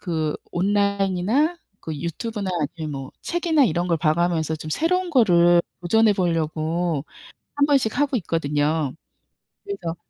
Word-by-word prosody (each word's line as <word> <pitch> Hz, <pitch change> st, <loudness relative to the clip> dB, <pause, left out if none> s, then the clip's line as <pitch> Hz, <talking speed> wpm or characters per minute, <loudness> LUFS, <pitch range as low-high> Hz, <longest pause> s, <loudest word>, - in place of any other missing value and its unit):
그 160 Hz, -4 st, -1 dB, 0.2 s
온라인이나 200 Hz, -, +1 dB, 0.2 s
그 160 Hz, -, -6 dB
유튜브나 195 Hz, -, -4 dB, 0.3 s
아니면 155 Hz, -2 st, -4 dB
뭐 135 Hz, -1 st, -6 dB
책이나 335 Hz, -4 st, +2 dB
이런 175 Hz, -2 st, 0 dB
걸 170 Hz, -, +2 dB
봐가면서 160 Hz, 0 st, +1 dB
좀 155 Hz, 0 st, -7 dB
새로운 360 Hz, -, 0 dB
거를 175 Hz, -, +5 dB, 0.2 s
도전해 220 Hz, +4 st, +3 dB
보려고 165 Hz, -3 st, -1 dB, 0.5 s
1 285 Hz, 0 st, +3 dB
번씩 270 Hz, -5 st, +2 dB
하고 285 Hz, -4 st, +2 dB
있거든요. 150 Hz, -4 st, -1 dB, 0.7 s
그래서 395 Hz, -, -5 dB
175 Hz, 285 characters per minute, -23 LUFS, 160-230 Hz, 0.7 s, 거를